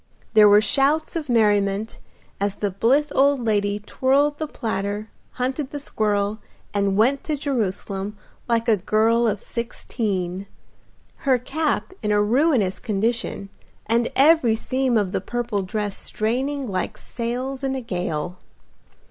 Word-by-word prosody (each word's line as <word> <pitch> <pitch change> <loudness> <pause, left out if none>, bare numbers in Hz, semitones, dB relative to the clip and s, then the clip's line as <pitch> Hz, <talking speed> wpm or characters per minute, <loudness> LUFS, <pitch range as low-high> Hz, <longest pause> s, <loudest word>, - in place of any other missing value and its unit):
There 210 -1 +8
were 205 +1 +7
shouts 280 +9 +1
of 310 -4 -3
merriment 210 -2 +2 0.4
as 200 0 0
the 205 -1 -2
blithe 270 +10 +2
old 280 0 +3
lady 205 -2 +1
twirled 275 +7 +1
the 310 - -2
platter, 210 -4 -3 0.2
hunted 260 +2 -2
the 290 - -5
squirrel, 210 -4 -1 0.3
and 200 -1 +1
went 260 +6 +3
to 305 -2 -1
Jerusalem 210 -6 -2 0.3
like 230 0 +1
a 220 -2 +4
girl 225 +5 +2
of 210 -2 0
sixteen; 200 -6 -3 0.7
her 265 -2 +2
cap 260 -3 -2
in 210 - -1
a 210 - +3
ruinous 225 - +2
condition, 220 -1 -1 0.4
and 235 +1 +1
every 275 -5 +5
seam 255 +1 0
of 200 -4 0
the - - -1
purple 235 -1 -2
dress 205 +1 -3
straining 265 +6 -2
like 185 -5 -3
sails 255 +3 -4
in 270 0 0
a 265 - -3
gale. 180 -5 -3
225 Hz, 140 wpm, -23 LUFS, 205-265 Hz, 0.7 s, There